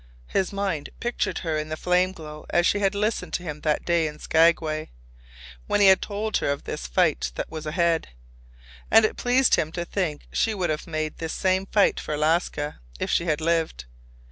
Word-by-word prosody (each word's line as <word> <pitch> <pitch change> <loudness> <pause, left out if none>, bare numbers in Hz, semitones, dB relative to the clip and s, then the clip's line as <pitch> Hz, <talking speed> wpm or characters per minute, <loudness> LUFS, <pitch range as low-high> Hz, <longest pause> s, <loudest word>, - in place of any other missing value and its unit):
His 190 - 0
mind 195 -7 -2
pictured 240 0 -1
her 155 -2 0
in 155 0 -5
the 155 - -3
flame 180 +2 +2
glow 155 -4 -10
as 175 0 +2
she 205 - +2
had 200 0 +1
listened 215 +2 -1
to 180 - -2
him 150 -3 -6
that 150 -1 0
day 170 -2 +2
in 150 0 -7
Skagway, 160 -1 +2 0.8
when - - +1
he 205 - +6
had 190 -1 +6
told 210 +1 -2
her - - -1
of 140 0 -2
this 60 - -5
fight - - +1
that - - -4
was 155 -1 -6
ahead. 165 +1 +1 0.8
And 225 0 +7
it - - -1
pleased 250 +1 +2
him 155 - -1
to 175 -1 -3
think 170 -6 -2
she 220 -1 +1
would 180 -5 0
have 150 - -4
made 155 -1 -3
this 160 -1 -3
same 190 +1 +1
fight 205 -1 +3
for 150 - -3
Alaska 150 -1 0 0.2
if - - -2
she 170 - +2
had 155 -2 0
lived. 160 - 0
170 Hz, 200 wpm, -25 LUFS, 155-195 Hz, 0.8 s, And